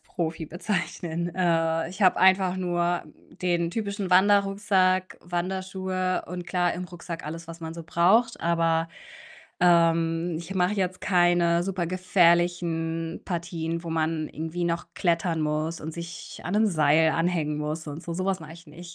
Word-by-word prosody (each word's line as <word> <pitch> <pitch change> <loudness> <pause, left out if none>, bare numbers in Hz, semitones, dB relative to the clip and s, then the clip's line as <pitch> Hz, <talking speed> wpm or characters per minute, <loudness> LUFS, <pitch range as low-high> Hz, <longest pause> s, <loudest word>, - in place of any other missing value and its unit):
Profi 165 -2 -4
bezeichnen. 175 -2 -3
Äh, 165 -3 +1
ich 185 +4 -10
habe 185 - +5
einfach 190 -1 +4
nur, 175 -1 0
hm, 150 - -20
den 170 -2 +1
typischen 200 -3 -3
Wanderrucksack, 195 -1 +3
Wanderschuhe 185 +1 -2
und 180 0 -6
klar, 180 -1 +1
im 180 - -5
Rucksack 170 -2 -8
alles, 165 +2 -7
was 165 0 -8
man 160 0 -6
so 170 - -7
braucht. 195 +9 +3
Aber, 165 -1 +1 0.7
ähm, 165 -1 +3
ich 175 +3 -7
mache 180 +1 +2
jetzt 185 -2 -2
keine 175 -2 +3
super 180 -2 -2
gefährlichen 170 -2 +1
Partien, 170 -1 -3
wo 165 - -5
man 160 -1 -1
irgendwie 160 +2 -4
noch 170 0 -1
klettern 170 -2 0
muss 155 +2 -2
und 160 - -5
sich 170 +1 -8
an 180 - -2
'nen 220 +1 +4
Seil 160 -3 +4
anhängen 165 -3 0
muss 155 +1 -4
und 150 +3 -7
so. 170 - -5
So 185 +2 -2
was 195 -2 0
mache 155 0 -10
ich 170 0 -15
nicht. 170 +3 -11
175 Hz, 160 wpm, -26 LUFS, 165-185 Hz, 0.7 s, habe